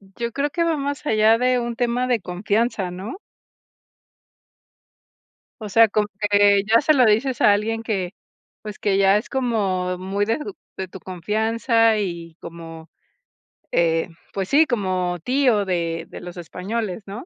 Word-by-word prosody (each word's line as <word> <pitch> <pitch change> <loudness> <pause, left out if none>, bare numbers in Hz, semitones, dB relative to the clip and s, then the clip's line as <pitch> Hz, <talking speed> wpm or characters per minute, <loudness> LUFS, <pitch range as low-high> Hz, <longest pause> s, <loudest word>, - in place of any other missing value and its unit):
Yo 235 0 -3
creo 285 +3 -1
que 335 +3 -1
va 330 -2 +1
más 285 +1 -4
allá 220 -1 +4
de 250 0 +2
un 235 0 -3
tema 245 +1 0
de 240 -5 +1
confianza, 200 +2 -1
¿no? 195 - -7 2.4
O 210 - -5
sea, 225 +2 +5
como 210 0 +1
que 205 -1 +4
ya 225 +2 +4
se 310 +1 +3
lo 255 -4 +5
dices 230 +4 +1
a 210 - +6
alguien 225 +2 0
que, 195 -4 -2 0.5
pues 210 -2 -8
que 195 -2 +1
ya 195 +1 +5
es 215 - -4
como 195 -8 -1
muy 195 +3 -2
de 225 +5 0
tu 365 +6 -7 0.2
de 190 - -4
tu 190 - -11
confianza 220 +5 +1
y 170 -5 -4
como, 165 -1 -10 0.8
eh, 165 +1 +1 0.2
pues 190 -1 -3
sí, 310 +3 +5
como 185 - -1
tío 250 -5 +2
de 170 -3 -2
de - - -9
los 180 0 -9
españoles, 190 +4 -4
¿no? 205 +8 -8
210 Hz, 160 wpm, -22 LUFS, 185-235 Hz, 2.4 s, a